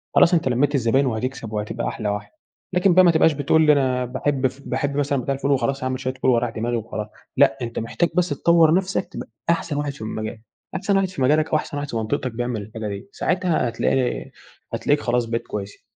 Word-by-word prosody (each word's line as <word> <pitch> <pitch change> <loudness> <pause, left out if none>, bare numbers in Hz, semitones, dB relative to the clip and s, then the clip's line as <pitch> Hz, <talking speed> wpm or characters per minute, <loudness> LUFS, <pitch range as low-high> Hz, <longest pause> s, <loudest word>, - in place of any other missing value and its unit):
خلاص 175 - +6
أنتَ 165 -5 +2
لميت 135 +4 +2
الزباين 130 +2 +2
وهتكسب 120 -1 -3
وهتبقى 105 0 -3
أحلى 105 -2 -3
واحد. 105 0 -4 0.4
لكن 180 0 +4
بقى 185 +1 +7
ما 175 - +7
تبقاش 160 -1 +4
بتقول 150 +2 +4
أنا 130 -3 +2
باحب 135 +2 0
ف 130 +2 -11
باحب 140 +2 -2
مثلًا 140 -2 +1
بتاع 135 - -1
الفول 140 +1 -1
وخلاص 135 +1 0
هاعمل 130 0 -1
شوية 130 -1 -2
فول 130 0 +1
واريّح 120 0 +2
دماغي 115 +2 -2
وخلاص، 110 -1 -5 0.3
لأ، 110 - +5
أنت 115 -1 -3
محتاج 140 +9 0
بس 180 -1 +2
تطور 165 +2 +4
نفسك 190 +1 0
تبقى 120 - -6 0.2
أحسن 165 -3 0
واحد 145 -1 -1
في 135 - -14
المجال، 110 0 -5 0.3
أحسن 195 +1 +1
واحد 195 -1 +2
في 180 -7 -7
مجالك 155 +4 +3
أو - - +1
أحسن 145 - -5
واحد 145 0 -4
في - - -5
منطقتك 110 +3 -2
بيعمل 120 -1 -3
الحاجة 110 +1 -6
دي، 100 - -6
ساعتها 180 -10 0
هتلاقي 125 +2 -1 0.4
هتلاقيك 145 0 +1
خلاص 120 0 +1
بقيت 115 0 -2
كويس. 100 -1 -6
130 Hz, 210 wpm, -22 LUFS, 115-150 Hz, 0.4 s, بقى